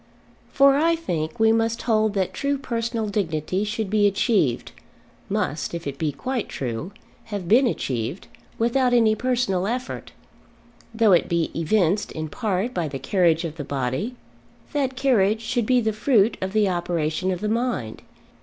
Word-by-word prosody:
For 275 Hz, 0 st, +5 dB
I 330 Hz, +3 st, +3 dB
think 175 Hz, -, -3 dB
we 220 Hz, 0 st, +5 dB
must 225 Hz, +1 st, 0 dB
hold 215 Hz, -2 st, +2 dB
that 190 Hz, -2 st, 0 dB
true 280 Hz, 0 st, -1 dB
personal 235 Hz, -4 st, -2 dB
dignity 185 Hz, -2 st, -1 dB
should 215 Hz, 0 st, -2 dB
be 205 Hz, +1 st, +3 dB
achieved, 195 Hz, -, +1 dB, 0.6 s
must, 155 Hz, +3 st, -2 dB
if 170 Hz, -, -6 dB
it 140 Hz, -1 st, -5 dB
be 155 Hz, -2 st, 0 dB
quite 250 Hz, -, -3 dB
true, 125 Hz, -, -4 dB, 0.3 s
have 205 Hz, -5 st, -5 dB
been 245 Hz, +7 st, +5 dB
achieved, 125 Hz, -, -3 dB, 0.3 s
without 245 Hz, +2 st, +2 dB
any 225 Hz, -2 st, +4 dB
personal 235 Hz, -6 st, 0 dB
effort. 250 Hz, +3 st, -4 dB, 0.8 s
Though 225 Hz, -2 st, +3 dB
it 175 Hz, -, +4 dB
be 170 Hz, -2 st, 0 dB
evinced, 180 Hz, +3 st, +1 dB
in 155 Hz, 0 st, -4 dB
part, 210 Hz, +4 st, -2 dB
by 170 Hz, -3 st, -1 dB
the 140 Hz, -2 st, -5 dB
carriage 165 Hz, +3 st, +2 dB
of 165 Hz, -1 st, -6 dB
the 145 Hz, -, -4 dB
body, 135 Hz, -, -2 dB, 0.6 s
that 270 Hz, -3 st, 0 dB
carriage 225 Hz, -6 st, +2 dB
should 230 Hz, 0 st, -1 dB
be 255 Hz, -1 st, +4 dB
the 220 Hz, -2 st, 0 dB
fruit 220 Hz, -1 st, +3 dB
of 190 Hz, +1 st, -3 dB
the 215 Hz, -2 st, +3 dB
operation 175 Hz, -1 st, -1 dB
of 180 Hz, -2 st, -1 dB
the 210 Hz, -, -1 dB
mind. 225 Hz, -, -2 dB
210 Hz, 165 wpm, -23 LUFS, 170-235 Hz, 0.8 s, For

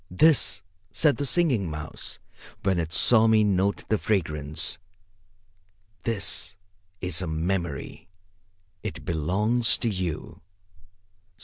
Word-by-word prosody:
"This," 115 Hz, -, +3 dB, 0.3 s
said 150 Hz, -3 st, +3 dB
the 145 Hz, -, -1 dB
Singing 130 Hz, -, +2 dB
Mouse, 75 Hz, 0 st, -5 dB, 0.5 s
when 95 Hz, -3 st, +1 dB
it 80 Hz, -1 st, -3 dB
saw 110 Hz, +4 st, +6 dB
me 110 Hz, -1 st, +5 dB
note 100 Hz, -1 st, +1 dB
the 110 Hz, -, +1 dB
fragrance, 75 Hz, -6 st, -2 dB, 1.2 s
"this 100 Hz, -3 st, -1 dB, 0.5 s
is 90 Hz, -1 st, -1 dB
a 90 Hz, -, -3 dB
Memory. 85 Hz, -1 st, -3 dB, 0.7 s
It -, -, -6 dB
belongs 105 Hz, +9 st, +1 dB
to 120 Hz, -, -2 dB
you. 90 Hz, -8 st, -4 dB
95 Hz, 105 wpm, -26 LUFS, 80-110 Hz, 1.2 s, saw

